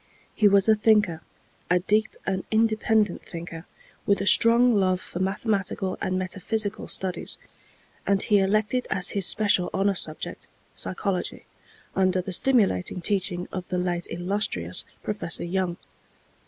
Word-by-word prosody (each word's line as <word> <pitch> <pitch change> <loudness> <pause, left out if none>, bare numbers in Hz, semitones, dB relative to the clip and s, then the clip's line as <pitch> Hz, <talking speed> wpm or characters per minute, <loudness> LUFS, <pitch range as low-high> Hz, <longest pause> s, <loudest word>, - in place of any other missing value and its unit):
He 210 - +4
was 200 0 +4
a 220 - +7
thinker, 210 -6 +2 0.5
a 180 - +4
deep 210 +4 0
and 190 -1 -1
independent 220 -2 +1
thinker, 165 0 -8 0.4
with 200 - +3
a 195 - -2
strong 235 +3 +5
love 185 -2 +2
for 175 - -8
mathematical 195 -1 -1
and 185 0 -1
metaphysical 200 +3 -2
studies, 185 -2 -3 0.7
and 200 -1 +3
he 210 -2 +3
elected 215 +5 +1
as 185 0 +2
his 195 -3 0
special 205 -4 +2
honor 195 +1 +2
subject, 155 -4 -3 0.3
psychology, 180 - -3 0.5
under 185 -1 +2
the 185 +1 -4
stimulating 195 - +2
teaching 180 -1 -1
of 185 - -4
the 180 - -1
late 175 -1 -1
illustrious 175 - -2 0.2
Professor 205 -5 -2
Young. 175 0 -2
190 Hz, 135 wpm, -25 LUFS, 180-210 Hz, 0.7 s, a